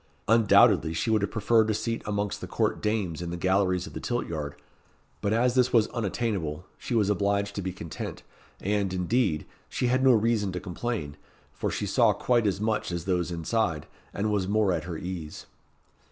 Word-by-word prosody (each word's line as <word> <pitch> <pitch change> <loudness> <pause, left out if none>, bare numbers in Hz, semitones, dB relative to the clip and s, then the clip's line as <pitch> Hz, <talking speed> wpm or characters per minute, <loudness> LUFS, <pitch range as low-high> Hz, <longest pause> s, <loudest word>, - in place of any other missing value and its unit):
Undoubtedly, 110 -7 +5
she 110 - 0
would 110 -2 +3
have 100 - 0
preferred 110 0 +2
a 110 - +1
seat 115 +1 -2
amongst 105 -1 -2
the - - -5
court - - 0
dames 100 -7 -1
in 85 - -4
the 85 - -4
galleries 95 0 +1
of - - -10
the - - -5
tilt 120 0 -2
yard, 75 -3 -4 0.7
but 100 - 0
as 120 +3 +3
this 125 -1 +3
was 115 -3 +5
unattainable, 100 -7 -2
she 120 - -3
was 105 -3 +3
obliged 100 0 0
to 100 - -3
be 95 0 -3
content; 85 -3 -7 0.4
and, 100 -1 0
indeed, 95 -3 +1 0.2
she - - -2
had 130 +2 +2
no 130 -1 +7
reason 110 -3 +2
to 90 - -4
complain, 90 -5 -4 0.4
for - - -2
she - - -2
saw - - +4
quite 120 -3 +1
as 95 -1 0
much 110 -3 -1
as 85 -1 -4
those 90 -2 0
inside, 85 -1 -1 0.3
and 105 +2 -1
was 100 -3 0
more 105 -1 +2
at 80 -2 -2
her 85 -2 -5
ease. 85 -4 -6
100 Hz, 195 wpm, -27 LUFS, 90-110 Hz, 0.7 s, no